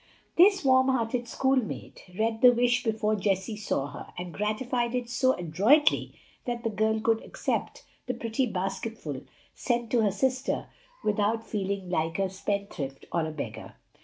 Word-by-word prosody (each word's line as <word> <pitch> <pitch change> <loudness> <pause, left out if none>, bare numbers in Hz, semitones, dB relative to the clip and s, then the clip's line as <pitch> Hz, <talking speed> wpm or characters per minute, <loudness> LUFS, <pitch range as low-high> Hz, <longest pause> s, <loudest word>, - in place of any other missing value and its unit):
This 385 -1 +5
warm 260 0 +5
hearted 240 -1 0
schoolmate 265 -2 -1
read 225 0 0
the 250 - +9
wish 245 0 +2
before 215 -1 +1
Jessie 195 +1 0
saw 205 -9 -1
her, 145 - -9
and 175 -1 -5
gratified 235 +3 -1
it 245 -1 -2
so 260 +1 +3
adroitly 200 - +3 0.3
that 240 -1 -3
the 225 - 0
girl 220 +2 +1
could 225 +1 +2
accept - - -3 0.2
the - - -1
pretty 230 +3 -1
basketful 190 - -4 0.3
sent 240 -2 -1
to 240 - +4
her 210 -2 +3
sister 260 +7 -1 0.3
without 210 +2 +1
feeling 195 -3 -3
like 165 -1 0
a 195 -1 0
spendthrift 190 -8 -4
or 165 -2 0
a - - -4
beggar. 155 - -7
220 Hz, 155 wpm, -28 LUFS, 195-245 Hz, 0.3 s, the